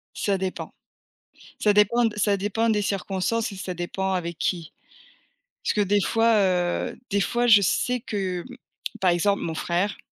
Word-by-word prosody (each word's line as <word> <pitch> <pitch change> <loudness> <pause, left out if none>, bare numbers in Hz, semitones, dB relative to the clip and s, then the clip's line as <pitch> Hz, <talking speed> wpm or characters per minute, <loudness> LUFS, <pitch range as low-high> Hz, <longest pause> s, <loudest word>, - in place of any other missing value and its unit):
Ça 200 -2 0
dépend. 190 0 -4 0.9
Ça 210 -1 +3
dépend, 210 +4 +4
d 220 -2 -1
ça 205 -1 +2
dépend 210 +4 0
des 210 -2 +2
circonstances 200 +3 -1
et - - -8
ça 185 -1 -4
dépend 190 +2 -3
avec 170 -2 -3
qui. 170 -3 -2 0.9
Parce - - 0
que 210 - +1
des 205 0 +2
fois 225 +3 +2
heu, 180 -3 +1
des 200 0 +1
fois 240 +6 +1
je 220 -3 +8
sais 250 +6 +1
que, 190 -5 -3 0.6
par 185 - +4
exemple, 200 +4 +1
mon 165 -1 -3
frère 180 +6 -1
200 Hz, 165 wpm, -24 LUFS, 180-210 Hz, 0.9 s, je